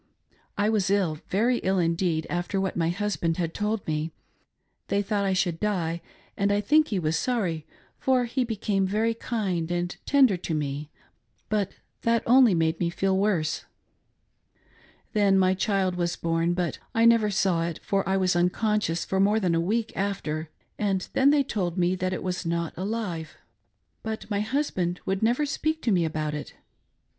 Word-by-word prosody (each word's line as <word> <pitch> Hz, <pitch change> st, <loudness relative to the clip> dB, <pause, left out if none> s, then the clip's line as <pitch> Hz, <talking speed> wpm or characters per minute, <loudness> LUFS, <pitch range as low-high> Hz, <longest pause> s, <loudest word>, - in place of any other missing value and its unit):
I 205 Hz, +1 st, +2 dB
was 210 Hz, -4 st, +1 dB
ill, 185 Hz, -6 st, +1 dB
very 235 Hz, +6 st, +2 dB
ill 190 Hz, +1 st, 0 dB
indeed, 165 Hz, -2 st, +1 dB
after 175 Hz, +3 st, -2 dB
what 190 Hz, -1 st, -1 dB
my 165 Hz, -1 st, +1 dB
husband 175 Hz, -3 st, -1 dB
had 165 Hz, -2 st, -2 dB
told 210 Hz, 0 st, -2 dB
me. 155 Hz, +1 st, -2 dB, 0.8 s
They 200 Hz, 0 st, +1 dB
thought 205 Hz, -1 st, 0 dB
I 190 Hz, -, +1 dB
should 175 Hz, -3 st, 0 dB
die, 170 Hz, -5 st, -1 dB, 0.3 s
and 200 Hz, 0 st, +1 dB
I 205 Hz, -, +2 dB
think 305 Hz, +9 st, +4 dB
he 205 Hz, -, -1 dB
was 160 Hz, -2 st, 0 dB
sorry, 180 Hz, -12 st, -1 dB, 0.3 s
for 255 Hz, -2 st, +2 dB
he 250 Hz, +2 st, 0 dB
became 205 Hz, -4 st, 0 dB
very 220 Hz, +4 st, +1 dB
kind 195 Hz, -8 st, -2 dB
and 175 Hz, 0 st, -2 dB
tender 265 Hz, -9 st, +5 dB
to 170 Hz, -2 st, -3 dB
me, 145 Hz, 0 st, -3 dB, 0.6 s
but 205 Hz, -3 st, 0 dB, 0.3 s
that 230 Hz, -1 st, +2 dB
only 245 Hz, -4 st, +6 dB
made 160 Hz, 0 st, +1 dB
me 170 Hz, -, +1 dB
feel 190 Hz, +2 st, 0 dB
worse. 185 Hz, -6 st, 0 dB, 1.5 s
Then 200 Hz, -3 st, +4 dB
my 185 Hz, 0 st, +4 dB
child 190 Hz, -1 st, 0 dB
was 175 Hz, -1 st, -1 dB
born, 165 Hz, +1 st, 0 dB
but 175 Hz, -3 st, -2 dB, 0.2 s
I 225 Hz, 0 st, +4 dB
never 230 Hz, -2 st, +5 dB
saw 190 Hz, -4 st, +1 dB
it, 170 Hz, -, -5 dB
for 195 Hz, -1 st, +1 dB
I 190 Hz, -, +2 dB
was 185 Hz, -2 st, +2 dB
unconscious 180 Hz, 0 st, +1 dB
for 190 Hz, -, -1 dB
more 205 Hz, +3 st, +4 dB
than 180 Hz, -5 st, +1 dB
a 165 Hz, -, +2 dB
week 220 Hz, +6 st, -1 dB
after, 165 Hz, -6 st, -2 dB, 0.3 s
and 195 Hz, -3 st, 0 dB
then 270 Hz, +1 st, +5 dB
they 290 Hz, -1 st, +4 dB
told 190 Hz, -9 st, -2 dB
me 180 Hz, 0 st, +2 dB
that 185 Hz, 0 st, -1 dB
it -, -, -3 dB
was 180 Hz, -1 st, -2 dB
not 170 Hz, -1 st, -2 dB
alive, 185 Hz, -4 st, -4 dB, 0.6 s
but 220 Hz, 0 st, -5 dB
my 200 Hz, -, +1 dB
hus 275 Hz, +8 st, 0 dB
band 175 Hz, -1 st, -2 dB
would 190 Hz, 0 st, -1 dB
never 240 Hz, +7 st, +2 dB
speak 315 Hz, +2 st, -1 dB
to 230 Hz, -, +2 dB
me' 175 Hz, -4 st, +3 dB
about 155 Hz, -1 st, -2 dB
it. 150 Hz, -, -6 dB
190 Hz, 180 wpm, -26 LUFS, 170-215 Hz, 1.5 s, only